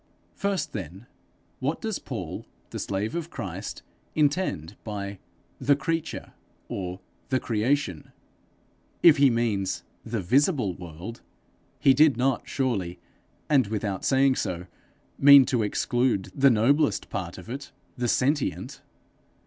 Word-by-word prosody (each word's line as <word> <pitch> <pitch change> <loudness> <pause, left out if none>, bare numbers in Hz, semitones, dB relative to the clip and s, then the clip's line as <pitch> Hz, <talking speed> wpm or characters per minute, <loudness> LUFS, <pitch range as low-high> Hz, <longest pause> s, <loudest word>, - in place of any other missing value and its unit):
First 200 -1 -2
then, 95 +1 -6 0.5
what - - -1
does - - -3
Paul, - - -6 0.2
the - - -5
slave 100 +2 -2
of 170 -1 -3
Christ, - - -6 0.3
intend 145 - 0
by 100 -2 -5 0.4
'the 140 +2 +4
creature' 165 +2 -3 0.3
or 90 -1 -5 0.3
'the 130 -1 +2
creation'? 115 - -1 0.9
If 160 -3 +8
he 140 -1 +6
means 115 -5 0 0.2
the 115 0 -3
visible 125 - +2
world, 90 +6 -9 0.6
he 135 - +5
did 150 -1 +5
not 130 +1 0
surely, 105 -11 -1 0.5
and 135 -7 +4
without 105 -2 -3
saying 135 -1 +3
so, 90 0 -3 0.5
mean 140 -1 +9
to 125 -3 +1
exclude 115 0 0
the 140 0 +5
noblest 135 +6 +2
part 90 -3 -4
of 90 - -11
it 135 +4 -6 0.2
the 125 -2 -1
sentient! 140 +5 0
120 Hz, 125 wpm, -26 LUFS, 100-140 Hz, 0.9 s, mean